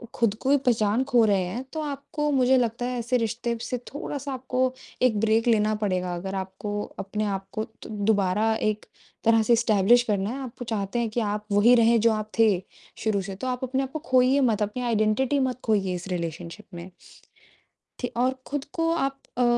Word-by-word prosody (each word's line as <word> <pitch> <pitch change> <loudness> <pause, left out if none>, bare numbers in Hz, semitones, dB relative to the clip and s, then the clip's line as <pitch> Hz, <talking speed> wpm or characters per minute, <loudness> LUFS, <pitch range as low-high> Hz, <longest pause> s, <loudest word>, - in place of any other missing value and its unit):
खुद 225 -3 +1
को 270 - -1
ही 285 - +6
पहचान 235 -2 +1
खो 245 -4 +4
रहे 200 -3 +3
हैं, 190 +8 -4
तो 315 - -2
आपको 295 +1 -3
मुझे 260 -1 +4
लगता 240 0 0
है 250 -1 -2
ऐसे 240 +2 +1
रिश्ते 235 +1 -2
से 250 - -3
थोड़ा-सा 280 -1 -5
आपको 255 0 -1 0.3
एक 220 -5 +3
ब्रेक 225 +1 +2
लेना 215 -2 +3
पड़ेगा 180 -2 -1
अगर 190 +3 -5
आपको 195 +2 -4 0.2
अपने 210 +2 -2
आपको 195 +1 -3
दु 220 - -14 0.2
दोबारा 210 +1 +2
एक 215 -1 -1 0.4
तरह 225 0 +5
से 235 - +3
एस्टेब्लिश 230 0 +4
करना 205 -3 -1
है, 260 +4 -4
आप 250 - -6
वो - - -3
चाहते 210 +2 -2
हैं 230 -2 0
कि 235 - -2
आप 210 0 -2
वोही 210 +5 +6
रहें 230 -1 +5
जो 230 0 +4
आप 215 0 -4
थे, 225 -1 +7 0.5
शुरू 210 -3 0
से 195 0 -6
तो 255 - -5
आप 250 0 -2
अपने 260 +1 0
आपको 270 +4 -5
खोइए 255 +2 +5
मत, 225 -5 +2
अपनी 210 +5 -3
आइडेंटिटी 235 +4 +1
मत 255 -2 -1
खोइए 200 -4 +1
इस 180 +2 -7
रिलेशनशिप 170 +2 -5
में। 175 +2 -8 1.1
ठी 245 - -1
और 255 +2 +2
खुद 285 -1 -3
को 330 0 0
आप 275 -4 -1 0.2
अ, 250 - +3
225 Hz, 200 wpm, -25 LUFS, 205-255 Hz, 1.1 s, थे